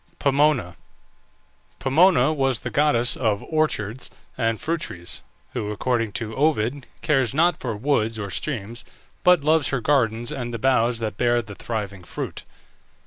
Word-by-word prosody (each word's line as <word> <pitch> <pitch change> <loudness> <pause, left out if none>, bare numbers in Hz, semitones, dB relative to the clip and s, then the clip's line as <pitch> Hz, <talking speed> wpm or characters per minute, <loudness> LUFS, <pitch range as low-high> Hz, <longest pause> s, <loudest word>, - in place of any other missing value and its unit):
POMONA. 140 - +2 1.0
Pomona 155 0 +4
was 135 -5 0
the - - -5
goddess 140 -5 +2
of 110 -5 0
orchards 130 -7 -1 0.3
and 115 -2 0
fruit 165 +1 -2
trees, 85 -1 -6 0.3
who, 110 -5 -3
according 115 +1 -1
to 110 0 -4
Ovid, 140 -3 0 0.2
cares 135 -5 +1
not 170 +3 +3
for 115 -5 -3
woods 115 -3 0
or 100 -2 -5
streams, 115 - -3 0.4
but 180 -5 +5
loves 155 -1 +3
her 135 - 0
gardens 120 -4 +1
and 120 -2 -4
the 115 - -3
boughs 125 -1 +2
that 110 -3 -4
bear 120 -1 +3
the 100 0 -9
thriving 100 -4 -5
fruit. - - -6
120 Hz, 145 wpm, -23 LUFS, 110-145 Hz, 1.0 s, but